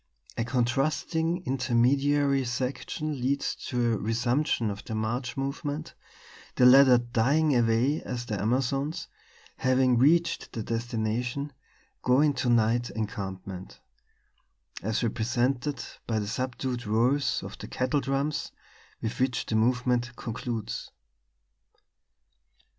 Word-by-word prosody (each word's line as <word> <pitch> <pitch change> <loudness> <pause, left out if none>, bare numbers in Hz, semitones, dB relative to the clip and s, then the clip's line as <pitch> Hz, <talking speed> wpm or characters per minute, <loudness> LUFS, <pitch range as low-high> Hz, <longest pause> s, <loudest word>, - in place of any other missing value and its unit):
A 115 - -1
contrasting 155 +8 0
intermediary 135 +2 +2
section 130 +3 -3
leads 140 +3 0
to 120 -2 +1
a - - 0
resumption 120 +1 0
of 100 - -7
the 110 - -5
march 120 +4 -2
movement, 145 +3 -3 0.6
the 125 - +5
latter 130 0 +8
dying 125 +6 +2
away 120 +5 +2
as 120 -1 -5
the 105 -5 -3
Amazons, 135 +7 0 0.5
having 130 -1 +3
reached 165 +6 +2
their 115 - -3
destination, 120 +4 -2 0.5
go 125 +1 +3
into 145 -4 +2
night 120 +1 +3
encampment 95 -4 -6 1.0
as 110 +3 -1
represented 120 +4 0 0.2
by 115 - 0
the 105 - -1
subdued 125 +1 -3
rolls 125 +6 +2
of - - -8
the - - -7
kettle 130 +3 0
drums, 135 +3 -1 0.5
with 110 - -3
which 130 -1 0
the 110 - -2
movement 125 +1 +1
concludes. 115 -1 -4
125 Hz, 110 wpm, -28 LUFS, 115-140 Hz, 1.0 s, latter